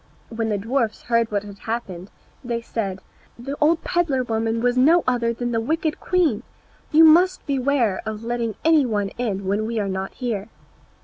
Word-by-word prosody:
When 225 -1 -2
the 210 - 0
dwarfs 225 +2 -1
heard 230 -1 +1
what 205 -1 -1
had 200 -1 -11
happened 200 -5 -5 0.3
they 240 -2 -2
said, 200 -5 -4 0.4
"The 270 +4 -5
old 320 +2 +3
pedlar 295 -7 0
woman 225 -1 -1
was 245 +1 +1
no 315 +7 +5
other 240 -2 +1
than 240 +1 -3
the 225 -1 0
wicked 315 +5 -1
queen; 330 - +1 0.5
you 315 +2 +7
must 345 +4 +5
beware 265 -7 +1
of 220 0 -5
letting 235 -2 -2
any 320 -2 +5
one 205 -5 -1
in 200 -5 -2
when 205 +3 0
we 230 -1 -2
are 205 - -1
not 190 0 -4
here!" 225 -5 -3
235 Hz, 180 wpm, -22 LUFS, 215-275 Hz, 0.5 s, you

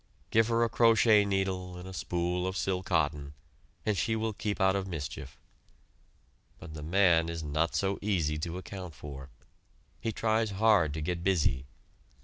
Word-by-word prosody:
Give 110 0 +4
her 115 0 +2
a - - +3
crochet 115 -2 +5
needle, 95 -2 -2
and 90 +1 -9
a 95 - -8
spool 90 +1 -1
of 95 0 -3
"sil 95 -1 -1
cotton," 75 -6 -1 0.5
and 105 - +1
she 110 +3 0
will 110 0 -1
keep 105 +1 -3
out 95 0 +3
of 95 -1 -2
mischief. 75 -7 -6 1.2
But 80 - -10
the 75 - -7
man 85 0 +3
is 85 -1 -4
not 75 +3 -1
so 100 0 0
easy 85 -7 0
to 85 +3 -4
account 90 -2 -8
for. 70 -2 -9 0.7
He 115 - -2
tries 110 +1 +1
hard 100 -9 +4
to 80 - -3
get 85 +2 -2
busy. 80 -8 +1
90 Hz, 165 wpm, -30 LUFS, 80-105 Hz, 1.2 s, crochet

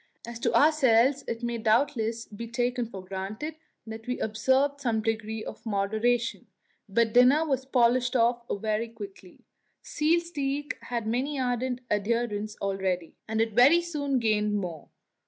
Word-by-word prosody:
As 235 0 -7
to - - 0
ourselves, 275 -3 +4
it 230 +1 -4
may 235 -1 -2
doubtless 230 0 +1
be 225 +2 -8
taken 245 +1 -1
for 190 -4 -9
granted 195 +11 -5 0.3
that 220 0 -9
we 250 - -2
observed 265 +6 +1
some 235 -4 0
degree 220 0 -2
of - - -9
moderation, 220 +4 0 0.4
but 225 +2 +2
dinner 255 +6 +6
was 265 -3 -1
polished 250 0 +2
off 240 0 +3
very 215 +2 -1
quickly. 200 -5 -11 0.4
Seal 315 +3 +2
steak 290 -4 -3
had 235 -2 -3
many 260 +6 -1
ardent 250 0 -1
adherents 215 0 -1
already, 190 -3 -2
and 220 0 0
it 225 -1 0
very 265 +9 +6
soon 295 -6 -2
gained 210 -3 +1
more. 175 -6 -5
235 Hz, 145 wpm, -27 LUFS, 215-260 Hz, 0.4 s, dinner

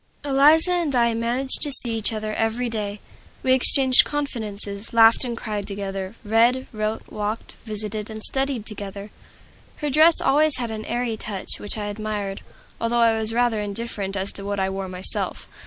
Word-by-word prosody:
Eliza 295 +5 +4
and 340 -6 +1
I 235 -1 +3
managed 240 +4 +2
to 295 - +7
see 240 -3 +2
each 220 0 +1
other 215 -1 -4
every 225 +2 -1
day; 210 -2 -4 0.4
we 260 - +3
exchanged 260 0 +5
confidences, 215 -8 -4
laughed 225 +1 +6
and 240 -2 -4
cried 210 -3 -4
together, 195 0 -5
read, 235 +4 +2
wrote, 215 0 -3
walked, 210 +1 -4
visited, 215 0 -5
and 220 0 -7
studied 270 -5 -2
together. 200 -1 -7 0.6
Her 295 -2 -3
dress 315 +4 +6
always 300 +2 +2
had 235 -2 -3
an 215 0 -6
airy 240 -2 -2
touch 205 -3 -5
which 205 - -3
I 210 - -4
admired, 205 -1 -4 0.4
although 230 +1 0
I 230 -1 +4
was 220 0 +3
rather 235 -1 +1
indifferent 205 -1 -4
as 190 +1 -1
to 200 - -6
what 200 0 -3
I 190 0 0
wore 190 -1 -5
myself. 185 0 -2
220 Hz, 170 wpm, -23 LUFS, 205-245 Hz, 0.6 s, to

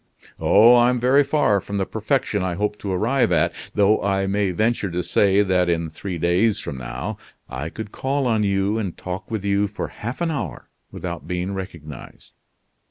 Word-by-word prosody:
"Oh! 115 +4 +6
I'm 120 +1 +3
very 130 +4 +4
far 135 -8 +2
from 100 +3 -5
the 95 - 0
perfection 110 -1 -1
I 90 -1 -1
hope 105 +2 -2
to 100 - -4
arrive 115 +4 +1
at; 85 +1 +2 0.2
though 105 +1 +3
I 95 -1 +1
may 100 0 0
venture 110 +2 0
to 90 +1 -2
say 100 0 +3
that 90 -2 +2
in 85 -2 -1
three 90 +2 -5
days 90 +6 +2
from 65 - -6
now 65 +1 -5 0.3
I 70 +5 -5
could 105 +3 -7
call 135 +1 -1
on 115 -3 +2
you 100 +1 +1
and 95 -6 -4
talk 95 +2 -6
with 110 -3 -3
you 100 +1 +2
for 105 - -5
half 120 +4 -6
an 170 -1 0
hour 150 - -5 0.2
without 85 -4 -6
being 90 +2 -2
recognized." 85 -8 -9
100 Hz, 185 wpm, -22 LUFS, 90-110 Hz, 0.3 s, Oh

